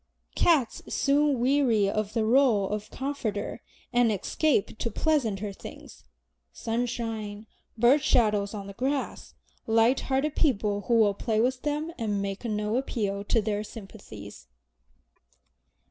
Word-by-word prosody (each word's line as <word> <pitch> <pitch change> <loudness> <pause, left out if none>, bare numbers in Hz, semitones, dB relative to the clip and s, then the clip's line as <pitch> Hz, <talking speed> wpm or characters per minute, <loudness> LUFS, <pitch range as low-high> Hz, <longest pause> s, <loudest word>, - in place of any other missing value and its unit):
Cats 290 -9 +2
soon 285 -1 +2
weary 245 -5 +3
of 210 +1 -2
the 225 -2 +1
role 230 -4 +4
of 210 0 -4
comforter, 235 -6 -4 0.3
and 240 -2 +4
escape 220 - 0
to 230 - -1
pleasanter 215 -7 0
things, - - -12 0.5
sunshine, 225 - -3 0.3
bird 245 +6 +5
shadows 210 -5 +2
on 200 -1 -6
the 200 - -8
grass, 270 +5 -3 0.3
light 225 +3 +4
hearted 275 +3 -1
people 210 -8 +1
who 235 - +3
will 215 -3 +4
play 220 +2 -1
with 250 +2 +1
them 300 +3 -2
and 210 -3 -1
make 195 +1 -4
no 210 0 -1
appeal 205 -6 -2
to 225 +1 +2
their 210 0 -1
sympathies. 195 - -11
225 Hz, 130 wpm, -27 LUFS, 205-260 Hz, 0.5 s, bird